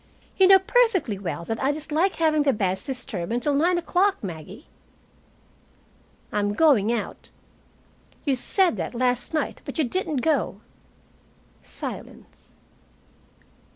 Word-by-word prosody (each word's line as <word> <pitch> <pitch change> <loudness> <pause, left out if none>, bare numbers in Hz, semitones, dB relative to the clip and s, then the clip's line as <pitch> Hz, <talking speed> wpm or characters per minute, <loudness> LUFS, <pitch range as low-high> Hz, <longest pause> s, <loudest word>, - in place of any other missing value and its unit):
"You 380 - +5
know 385 0 +9
perfectly 380 - +1
well 170 -3 -4
that 225 +4 -3
I 270 +2 +2
dislike 310 +5 -1
having 310 -2 +2
the 280 -2 +2
beds 190 -2 -1
disturbed 250 -8 -4
until 245 +5 0
nine 340 +5 +2
o'clock, 370 +3 +1
Maggie." 185 - -8 1.7
"I'm 205 0 0
going 235 -7 +4
out." 235 -3 -4 1.0
"You 275 -3 +2
said 355 +7 +1
that - - -4
last 245 0 0
night, 315 -2 -2
but - - -6
you 315 - +3
didn't 305 0 -2
go." 320 - 0 1.0
Silence. - - -9
280 Hz, 120 wpm, -24 LUFS, 220-335 Hz, 1.7 s, know